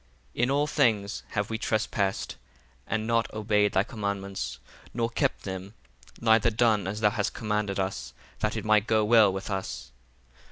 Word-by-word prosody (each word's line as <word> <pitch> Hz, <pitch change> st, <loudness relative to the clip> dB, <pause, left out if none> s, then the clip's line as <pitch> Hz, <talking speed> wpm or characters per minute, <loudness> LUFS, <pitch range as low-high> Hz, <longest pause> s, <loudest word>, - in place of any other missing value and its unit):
7 -, -, -2 dB
In -, -, -2 dB
all 145 Hz, +2 st, +2 dB
things 110 Hz, -9 st, +1 dB
have 105 Hz, 0 st, -1 dB
we 110 Hz, -, -2 dB
trespassed, 105 Hz, -3 st, -1 dB, 0.5 s
and 110 Hz, 0 st, -1 dB
not 115 Hz, 0 st, +1 dB
obeyed 105 Hz, -1 st, +2 dB
thy 95 Hz, -, +3 dB
commandments, 100 Hz, -2 st, -4 dB, 0.4 s
nor 115 Hz, -1 st, 0 dB
kept -, -, 0 dB
them, 95 Hz, +2 st, -6 dB, 0.4 s
neither 115 Hz, -1 st, +4 dB
done 110 Hz, -4 st, +2 dB
as 105 Hz, +3 st, -4 dB
thou 105 Hz, -1 st, +4 dB
hast 105 Hz, -2 st, -2 dB
commanded 105 Hz, -3 st, -1 dB
us, 95 Hz, 0 st, -3 dB, 0.3 s
that 105 Hz, +1 st, -1 dB
it 110 Hz, -, -4 dB
might 110 Hz, 0 st, +3 dB
go 110 Hz, -1 st, +3 dB
well 110 Hz, -3 st, +6 dB
with 95 Hz, +2 st, -5 dB
us. -, -, -4 dB
105 Hz, 165 wpm, -27 LUFS, 100-110 Hz, 0.5 s, well